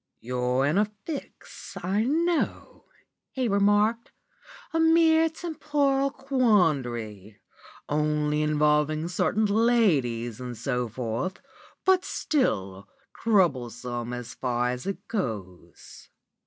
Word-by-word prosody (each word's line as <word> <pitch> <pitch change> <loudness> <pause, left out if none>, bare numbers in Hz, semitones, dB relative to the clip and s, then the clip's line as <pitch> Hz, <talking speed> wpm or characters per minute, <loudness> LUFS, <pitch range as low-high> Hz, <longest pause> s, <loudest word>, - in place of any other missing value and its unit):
"'You're 125 +2 0
in 155 +7 +2
a 210 - +4 0.2
fix, 305 -4 -8
I 195 +4 +1
know,' 330 +5 -1 0.4
he 260 -2 -2
remarked, 205 +3 +2 0.6
'a 325 - +1
mere 325 0 +5
temporal 295 -4 0
quandary, 140 - 0 0.5
only 150 0 0
involving 150 +1 +2
certain 190 +4 +1
ladies 160 - +1
and 125 -2 -6
so 125 +2 -2
forth, 115 - -4 0.5
but 375 -1 +4
still 100 - -1 0.3
troublesome 125 - 0
so 125 0 -4 0.2
far 125 -1 0
as 125 +7 -6
it 195 -1 -5
goes. 95 - -6
155 Hz, 100 wpm, -26 LUFS, -, 0.6 s, mere